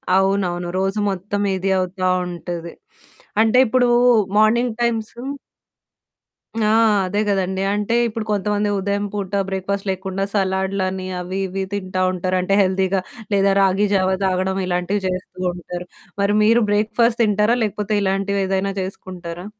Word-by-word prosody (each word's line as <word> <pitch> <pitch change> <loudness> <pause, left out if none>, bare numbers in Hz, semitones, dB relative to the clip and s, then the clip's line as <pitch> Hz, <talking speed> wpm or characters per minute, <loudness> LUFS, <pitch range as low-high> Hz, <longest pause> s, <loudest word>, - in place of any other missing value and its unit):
అవునవును. 190 -2 +1
రోజు 195 +2 0
మొత్తం 200 +2 -3
ఇది 190 +1 -1
అవుతా 185 0 -1 0.2
ఉంటది. 170 -1 -6 0.7
అంటే 225 +2 +3
ఇప్పుడు 245 +1 +3 0.5
మార్నింగ్ 230 +2 +3
టైమ్సు 235 0 -1 1.4
ఆ! - - +3 0.4
అదే 205 +3 -1
కదండీ! 190 -1 0
అంటే 210 +2 -1
ఇప్పుడు 225 -1 -4
కొంతమంది 205 +1 0
ఉదయం 200 +1 -1
పూట 200 -2 -4 0.2
బ్రేక్‌ఫాస్ట్ 195 +1 -3
లేకుండా 190 +1 -3
సలాడ్లని 190 -1 -1
అవి, 185 +2 -4
ఇవి 190 +1 -3
తింటా 185 -2 -2
ఉంటారు. 185 0 -1
అంటే 190 +2 0
హెల్తీగా 190 0 +1 0.3
లేదా 195 0 +3
రాగి 195 +2 +3
జావ 190 -1 +2
తాగడం 190 0 0
ఇలాంటివి 180 +3 -1
చేస్తూ 185 0 -5
ఉంటారు. 180 0 -7 0.3
మరి 200 +1 +2
మీరు 230 +2 +4
బ్రేక్‌ఫాస్ట్ 225 +3 +2
తింటారా? 210 +2 +3
లేకపోతే 210 0 -2
ఇలాంటివేదైనా 195 0 0
చేసుకుంటారా? 180 -2 -7
195 Hz, 125 wpm, -20 LUFS, 185-205 Hz, 1.4 s, మీరు